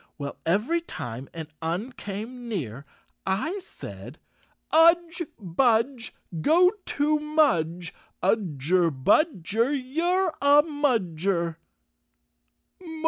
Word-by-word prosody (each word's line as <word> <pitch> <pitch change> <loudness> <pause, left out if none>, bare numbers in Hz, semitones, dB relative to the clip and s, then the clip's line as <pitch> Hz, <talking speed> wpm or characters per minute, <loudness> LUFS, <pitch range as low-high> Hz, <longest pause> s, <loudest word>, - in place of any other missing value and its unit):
.Well, 140 -2 -5
every 225 - +1
time 125 - -7
an 160 -2 -7
Un 175 +10 -2
came 235 +3 -7
near 140 - -5 0.4
I 265 - -1
said: 370 - -10 0.3
" - - -31
Udge! 335 +1 +5
Budge! 230 +6 +1 0.3
Go 355 - +5
to 300 +1 +1
Mudge! 180 - +1 0.3
Udger 175 - +2
budger, 210 - +2
You're 340 +7 0
a 285 +1 +6
Mudger! 190 - 0
225 Hz, 90 wpm, -26 LUFS, -, 0.4 s, a